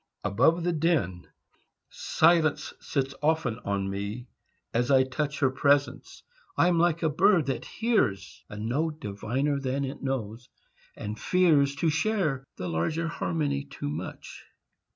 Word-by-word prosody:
ABOVE 160 - +2
THE 175 0 +1
DIN 145 - 0 0.6
Silence 160 -2 +2
sits 135 -2 -2
often 150 -7 +1
on 100 -4 -2
me 100 +5 -5 0.4
as 120 +2 +1
I 135 -1 +6
touch 140 +3 -3
Her 130 -2 +3
presence; 140 +1 0 0.3
I 175 - +4
am 170 -2 +2
like 170 -1 +2
a - - +4
bird 165 +2 +3
that 135 - -3
hears 160 - -1
A 105 - -8
note 150 +9 -2
diviner 125 +8 -2
than 135 +1 -1
it 135 - -7
knows, 120 -3 -4 0.5
and 105 +1 -6
fears 150 -7 +3
To 160 +2 +1
share 165 -6 0
the 90 - -5
larger 90 - -1
harmony 150 -4 -2
too 140 - -6
much. 80 +5 -7
140 Hz, 140 wpm, -27 LUFS, 115-160 Hz, 0.6 s, I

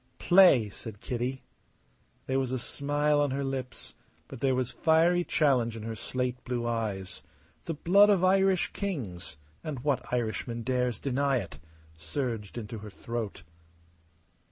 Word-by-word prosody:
"Play!" 175 - +6
said 105 0 -8
Kitty. 125 +3 -3 0.8
There 130 0 0
was 130 -2 -1
a 130 - 0
smile 145 +3 0
on 145 - +2
her 140 +1 -2
lips, 135 -2 -5 0.3
but - - -9
there 135 0 +2
was 125 -1 -1
fiery 170 +2 +3
challenge 125 -9 +2
in 110 - -7
her 115 0 -4
slate 125 +2 -3
blue 120 -2 -2
eyes. 105 -5 -3 0.4
The 165 - -3
blood 200 +7 +5
of 195 -3 +3
Irish 190 0 +3
kings 115 - -4 0.3
and 145 -6 -4
what 145 -3 -1
Irishman 115 0 -2
dares 125 -2 0
deny 140 0 +1
it? 85 -10 -6 0.4
surged 105 - -4
into 115 0 -6
her 105 +1 -8
throat. 110 -4 -5
125 Hz, 145 wpm, -29 LUFS, 115-145 Hz, 0.8 s, Play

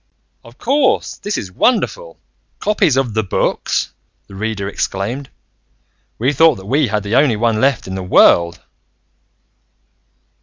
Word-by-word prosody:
"Of 115 +1 -16
course! 270 +1 0
This 205 0 -4
is 95 - -6
wonderful. 255 - -1 0.4
Copies 185 -10 +1
of 130 -5 0
The 110 - +1
Books!" 100 - -1 0.3
the - - -16
Reader 100 0 -4
exclaimed. 105 +7 -4 0.9
"We 130 +6 0
thought 160 +1 +5
that 95 - -11
we 135 +6 +1
had 105 -1 -2
the 105 +2 -2
only 135 -4 +4
one 110 0 0
left 135 -3 +1
in 95 - -5
the 95 - -4
world!" 85 -2 +4
115 Hz, 140 wpm, -17 LUFS, 100-145 Hz, 0.9 s, thought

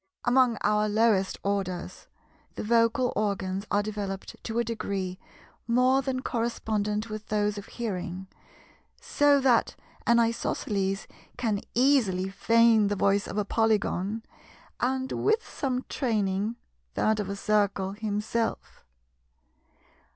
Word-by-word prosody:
Amongst 245 -2 +4
our 210 0 +2
lowest 210 -3 +2
orders, 190 -3 -3 0.5
the - - -4
vocal 230 +3 +2
organs 200 -1 -1
are 205 0 +2
developed 200 -2 -5
to 225 0 -3
a 235 - +3
degree 200 -5 -3 0.5
more 255 +3 +4
than 260 -1 -3
correspondent 215 -2 -1
with 215 0 -6
those 210 -1 0
of 200 - -11
hearing, 190 -5 -4 0.7
so 290 -1 +3
that 255 -3 +3 0.3
an 235 - +5
Isosceles 200 -4 -1 0.3
can 220 -5 0
easily 230 -8 +3
feign 225 +1 +4
the 205 - 0
voice 200 +1 +2
of - - -5
a 210 - +1
Polygon, 215 -1 0 0.6
and, 260 +1 -1
with 440 +2 +1
some 255 -2 -2
training, 210 -3 -1 0.4
that 215 0 +2
of 200 -2 -3
a 200 - -3
Circle 200 -2 +1
himself. 210 +2 -3
215 Hz, 120 wpm, -27 LUFS, 200-235 Hz, 0.7 s, an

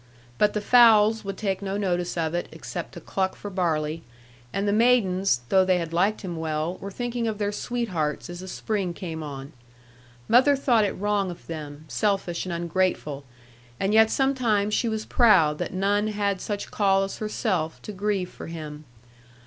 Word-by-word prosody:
But 210 0 +3
the 210 - -1
fowls 220 -1 +6
would 195 -1 -5
take 195 -3 -2
no 195 0 -2
notice 180 -3 -1
of 160 -1 -1
it, 175 - -2
except - - -7
to - - -8
cluck 190 -1 -2
for 205 - -8
barley; 160 -4 -1 0.5
and 195 +1 -1
the 205 - +2
maidens, 195 - +3
though 190 -1 +5
they 185 -1 +3
had 165 -2 -4
liked 195 +5 +1
him 175 -5 -5
well, 160 +2 -2
were 200 - -7
thinking 240 +2 -3
of 220 -2 -2
their 205 -1 -1
sweethearts 205 -10 -2
as 175 0 -8
the 185 - -8
spring 190 -2 -2
came 160 -3 -5
on. 140 0 -7 0.7
Mother 260 +4 +5
thought 240 -5 +3
it 200 - -1
wrong 205 -1 0
of 175 -1 -9
them, 150 -2 -7
selfish 195 -4 -1
and - - -3
ungrateful; 170 -4 -1 0.5
and 195 +2 0
yet 220 0 +6
sometimes 235 -7 +1
she 230 - +1
was 220 -1 -3
proud 165 -11 +4
that - - -3
none 200 +3 +1
had 205 -3 -1
such 205 -1 -4
call 195 -2 +3
as 195 - -5
herself 190 -7 -2
to - - -6
grieve 200 -2 -2
for - - -9
him. 155 -2 -7
195 Hz, 180 wpm, -25 LUFS, 170-210 Hz, 0.7 s, fowls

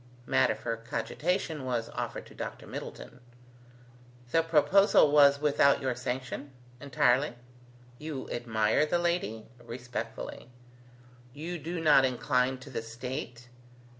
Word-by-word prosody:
Matter 130 -1 +3
for 115 - -4
cogitation 150 - -2
was 120 -3 -2
offered - - -5
to - - -15
Dr. - - -7
Middleton. - - -8 1.1
"The 165 - +4
proposal 165 +1 +4
was 140 -1 +6
without 140 -1 +4
your 130 -2 -1
sanction?" 130 +2 -5 0.3
"Entirely." 130 -1 +2 0.6
"You 150 -3 -5
admire 115 +3 +1
the 175 - +1
lady?" 170 -11 -1 0.2
"Respectfully." 120 0 -6 0.9
"You 170 +4 -5
do 165 +3 -4
not 150 -4 +6
incline 130 0 +1
to - - -11
the - - -3
state?" 120 +1 -6
130 Hz, 115 wpm, -29 LUFS, 120-150 Hz, 1.1 s, was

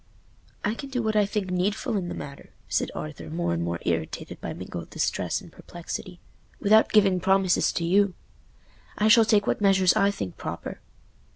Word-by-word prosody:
"I 210 - +1
can 275 +4 -7
do 250 -3 -2
what 220 -1 0
I 210 -1 +4
think 200 -3 -2
needful 190 +4 0
in 185 -3 -1
the - - -4
matter," 140 0 -9 0.2
said - - 0
Arthur, 80 +1 -6
more 85 +2 -1
and 85 - -1
more 85 0 -2
irritated 80 -2 -3
by - - -4
mingled - - -7
distress - - -1
and - - -14
perplexity, 175 +1 -8 0.4
"without 215 +2 +4
giving 195 -4 +4
promises 190 0 +3
to 170 - -1
you. 195 +2 +3 0.8
I 210 - +3
shall 225 0 +7
take 210 -2 +3
what - - 0
measures 190 -3 +4
I 200 - +4
think 100 - -5
proper." - - -6
190 Hz, 180 wpm, -26 LUFS, 165-210 Hz, 0.8 s, shall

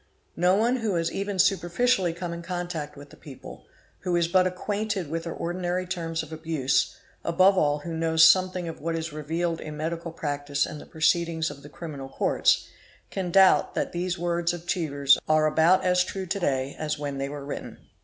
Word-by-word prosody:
No 180 +2 +3
one 235 +5 +2
who 220 -6 -1
has 165 0 0
even 200 0 -3
superficially 190 +2 +2
come 170 0 -5
in 170 - -6
contact 175 -4 -5
with 145 0 -12
the - - -13
people, 135 -4 -12 0.3
who 180 -2 -1
is 170 -1 +2
but 185 +1 +3
acquainted 200 -2 -3
with 165 +1 -3
their 165 - -4
ordinary 180 +1 -2
terms 165 -3 -3
of 160 0 -10
abuse, 155 -4 0 0.3
above 185 +4 +4
all 145 -5 +2
who 165 +1 -5
knows 160 0 +3
something 185 -1 +3
of 165 - -6
_ - - -17
what 165 +2 -2
is 165 -1 -4
revealed 165 +3 -2
in 150 -1 -7
medical 165 +2 -3
practice 145 -3 -2
and 150 - -8
the - - -13
proceedings 165 0 +1
of 140 -1 -11
the 145 - -12
criminal 145 -4 -8
courts, - - +2 0.4
can 185 -2 -3
doubt 190 +1 +5
that - - -1
these 175 +1 -2
words 170 0 0
of 175 -1 -8
Chevers"® 140 -6 +3
are 155 0 +4
about 160 +4 +4
as 180 0 +4
true 190 +1 -5
to 185 - -2
_ - - -13
day 135 -3 -1
as 155 -1 -2
when 145 -2 -4
they 135 0 -2
were 145 -1 -7
written. 145 - -6
170 Hz, 205 wpm, -26 LUFS, 155-180 Hz, 0.4 s, doubt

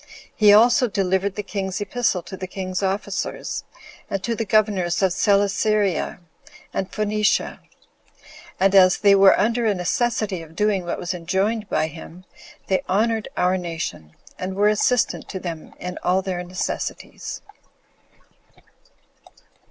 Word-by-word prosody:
He 210 -1 +6
also 235 +4 +6
delivered 195 -1 0
the 210 - -3
king's 195 -1 -3
epistle 205 -4 -1
to 190 - -8
the 185 0 -6
king's 185 0 -4
officers, 195 +1 -3 0.5
and 195 -1 -3
to 235 - -1
the 225 0 -2
governors 195 -4 +1
of 185 -2 +3
Celesyria 200 -2 +1 0.5
and 190 0 -3
Phoenicia; 210 0 0 1.0
and 195 +1 +3
as 185 -2 +6
they 200 -1 +5
were 195 -1 +6
under 230 +3 +1
a 210 - +2
necessity 205 0 -1
of 160 0 -13
doing 205 -2 +1
what 170 - -3
was 175 +2 -3
enjoined 190 +5 -1
by - - +1
him, 165 +3 -10 0.4
they 190 - +1
honored 220 +3 +1
our 180 +1 +2
nation, 165 - -5 0.3
and 185 +1 -4
were 205 +1 +4
assistant 225 +3 +1
to 190 - -5
them 165 -4 -7
in 180 0 -6
all 185 +1 +2
their 180 -2 -3
necessities. 180 +1 -5
195 Hz, 135 wpm, -22 LUFS, 180-210 Hz, 1.0 s, He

